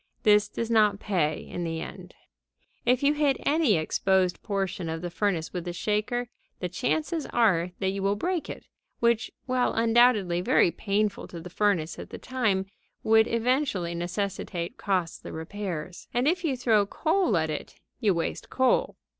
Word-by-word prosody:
This 210 -1 +5
does 230 0 -3
not 210 -3 +4
pay 165 -8 0
in 175 - -4
the 165 -1 -3
end. - - -9 0.7
If 250 +2 +3
you 285 +1 +4
hit 295 -2 +2
any 295 -7 +3
exposed 185 +3 +1
portion 195 -5 -2
of 160 +1 -4
the 175 - -4
furnace 175 -4 -1
with 180 -2 -3
the 175 0 -4
shaker 215 +6 -1 0.3
the 180 - -3
chances 310 - -1
are 185 -7 +2
that 190 - 0
you 195 0 -4
will 200 +1 +1
break 350 - -2
it, - - -7 0.3
which, 235 -1 +2 0.2
while 255 -1 +1
undoubtedly 225 -6 +3
very 180 - +4
painful 205 +4 -1
to 170 - -8
the 175 +2 -9
furnace 180 -6 0
at - - -8
the - - -7
time, 220 -7 0 0.4
would 220 0 +5
eventually 230 -7 0
necessitate 175 +2 -3
costly 185 -5 -2
repairs. 175 0 -6
And, 245 +3 +2
if 350 +3 +1
you 280 -6 0
throw 220 -5 +3
coal 315 - +1
at 160 -1 0
it, 150 - -6 0.2
you 210 -7 +2
waste 165 - -3
coal. 260 -1 +2
205 Hz, 165 wpm, -27 LUFS, 175-240 Hz, 0.7 s, This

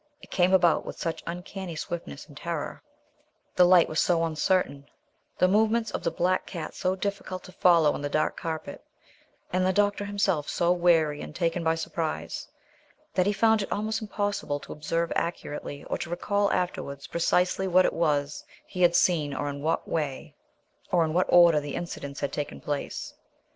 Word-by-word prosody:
It - - -16
came 180 0 +3
about 175 -3 +4
with - - -8
such 165 -1 -3
uncanny 180 0 -6
swiftness 165 -2 -6
and 145 - -16
terror; 165 0 -4 0.7
the 180 - +6
light 180 -1 +6
was 155 - -1
so 170 -2 +2
uncertain; 155 -3 0 0.5
the 185 - +4
movements 220 +3 +2
of - - -3
the - - 0
black 185 +2 0
cat 170 -4 -6
so 185 +1 -1
difficult 190 -2 -4
to - - -12
follow 170 -5 +4
on - - -5
the 145 - -2
dark 155 +1 0
carpet, 160 -2 -5 0.7
and 185 0 +2
the 185 - +3
doctor 205 +1 +1
himself 195 -7 0
so 175 0 +1
weary 165 -4 +3
and - - -8
taken 170 -1 0
by 160 0 +2
surprise 160 - -4 0.7
that 185 +1 +2
he - - +3
found 220 +2 +3
it 200 - -5
almost 215 +2 -1
impossible 205 -8 -2
to - - -8
observe 165 +3 -1
accurately, 145 -4 -4
or - - -3
to - - -5
recall 200 +4 0
afterwards 140 -6 -2
precisely 180 +3 +1
what 185 0 +5
it - - +1
was 150 -3 0 0.2
he 180 - -6
had 175 -1 +5
seen 150 -6 +2
or 145 - -2
in 140 0 -6
what 160 +2 0 1.1
order 170 -1 +5
the 145 -1 -5
incidents 140 -5 -6
had 140 - -2
taken 145 - -4
place. 145 -1 -4
170 Hz, 170 wpm, -27 LUFS, 155-185 Hz, 1.1 s, the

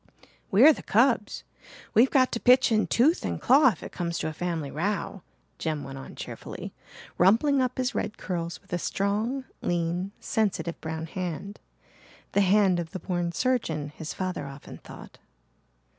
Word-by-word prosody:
"We're 255 +11 +7
the - - -9
cubs 230 -1 +2 0.5
we've 240 +4 +5
got 260 -2 +3
to 230 - -2
pitch 250 0 +5
in 215 -1 +2
tooth 300 +9 +3
and - - -3
claw 270 +3 +5
if 240 - 0
it - - -7
comes 170 -1 -3
to - - -2
a 155 - -4
family 160 -4 -3
row," 195 +3 -2 0.4
Jem 155 -3 -2
went 135 0 -8
on - - -10
cheerfully, - - -8 0.5
rumpling 230 - +4
up 255 -1 -1
his 255 0 -1
red 210 - -3
curls 170 -4 -4
with - - -12
a 175 - 0
strong, 215 +9 -1 0.2
lean, 175 +2 -1
sensitive 200 -6 -1
brown 160 0 -4
hand 180 +3 -5 0.7
the 200 - +3
hand 195 -2 +4
of 165 -2 -6
the 185 - -4
born 175 -2 -2
surgeon, 170 - -1
his 155 +1 -7
father 185 -6 -4
often 135 0 -10
thought. - - -13
190 Hz, 165 wpm, -27 LUFS, 165-235 Hz, 0.7 s, We're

